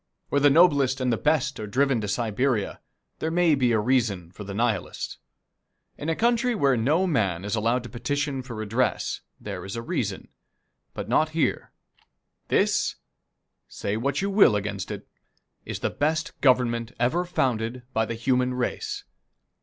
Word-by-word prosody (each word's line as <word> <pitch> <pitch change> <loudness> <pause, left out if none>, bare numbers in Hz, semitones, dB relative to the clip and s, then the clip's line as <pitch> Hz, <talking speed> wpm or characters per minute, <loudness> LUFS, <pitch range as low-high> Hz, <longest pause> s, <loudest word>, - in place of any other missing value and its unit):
Where 140 - +2
the 145 - +7
noblest 140 -4 +4
and 125 -2 +1
the - - +3
best 150 -3 +1
are 105 - -4
driven 130 +2 +2
to 105 - -3
Siberia, 115 +1 0 0.4
there 160 - -1
may 170 -1 +3
be 130 -4 +2
a 115 - +3
reason 105 -7 0
for 105 - -9
the 100 -1 -6
Nihilist. 115 -4 -2 0.8
In 150 - -4
a 165 - +1
country 240 +3 +2
where 140 -9 +3
no 145 +11 +2
man 100 - 0
is 105 - -3
allowed 115 +3 +1
to 120 - -8
petition 140 +3 -2
for 125 -2 -8
redress, 110 +4 -1 0.2
there - - -6
is 95 +2 -6
a 115 - -4
reason, - - -3 0.7
but - - -5
not 155 0 +3
here. 160 - 0 0.8
This - - +2 0.7
say 100 - -3
what 140 - -1
you 200 - 0
will 195 - +6
against 100 -2 -3
it - - -5 0.6
this - - -5
is - - -15
the - - 0
best 155 +1 0
Government 125 -3 +2
ever 125 +9 +2
founded 125 -7 -1
by 110 0 +1
the 115 - -3
human 125 +1 +1
race! 410 - -3
125 Hz, 170 wpm, -26 LUFS, 110-150 Hz, 0.8 s, the